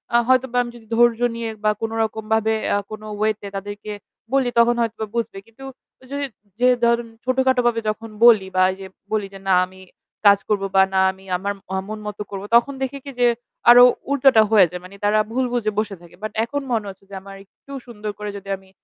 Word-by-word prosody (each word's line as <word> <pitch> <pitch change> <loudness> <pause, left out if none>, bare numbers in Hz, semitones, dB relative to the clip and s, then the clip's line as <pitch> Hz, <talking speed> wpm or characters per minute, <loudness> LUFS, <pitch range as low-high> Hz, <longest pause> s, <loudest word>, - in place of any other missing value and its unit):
আ - - +8
হয়তোবা 255 -1 +2
আমি 240 - -8
যদি 230 -2 -14
ধৈর্য 235 0 +4 0.2
নিয়ে 230 -1 -4
বা 215 - +4
কোন 225 0 -2
রকম 220 0 -4
ভাবে 220 0 +2 0.2
আ - - +2
কোন 215 0 -7 0.2
ওয়ে 215 +1 +3
তে 200 - -7
তাদেরকে 205 +2 -7 0.4
বলি 270 -2 +2
তখন 235 +1 +4
হয়তো 225 -1 -2
বুঝবে। 230 -4 -2
কিন্তু 230 +4 -16 0.4
ঐযে 270 +2 -7 0.4
যে 250 - +4 0.2
ধরেন 235 0 +2 0.2
ছোটখাটো 260 0 +2
ভাবে 230 -1 +1
যখন 225 +2 -5 0.2
বলি 215 -5 +6
বা 185 - +4
এই - - -7
যে 195 - -8 0.3
বলি 215 -2 0
যে 195 - -10
না 185 - +5
আমি 190 0 -16 0.5
কাজ 200 0 +7
করব 205 -2 +1
বা 190 - +7
না 190 - +3
আমি 190 0 -18
আমার 200 +3 -3 0.2
আ - - 0
মন 215 0 -6
মত 210 - -6
করব 195 -1 -5
তখন 240 +4 +4
দেখে 265 +1 -3
কি 280 - -6
যে 245 - +5 0.4
আরো 245 +1 +10 0.3
উল্টোটা 270 -4 +5
হয়ে 210 -4 +7
যায়। 180 +1 -7
মানি 185 +2 -12
তারা 210 +1 +3
ভুল 255 +2 0
বুঝে 225 -3 0
বসে 210 -2 -2
থাকে। 175 0 -16
বাট 215 - -3
এখন 285 +5 -3
মনে 225 -3 0
হচ্ছে 195 0 -13
যে 195 - -9
আমার 195 0 -11
একটু 275 - -19 0.2
সুন্দর 210 -3 -6
করে 210 0 -5
যদি 200 0 -11
আমি 190 0 -22
220 Hz, 220 wpm, -21 LUFS, 200-240 Hz, 0.5 s, আরো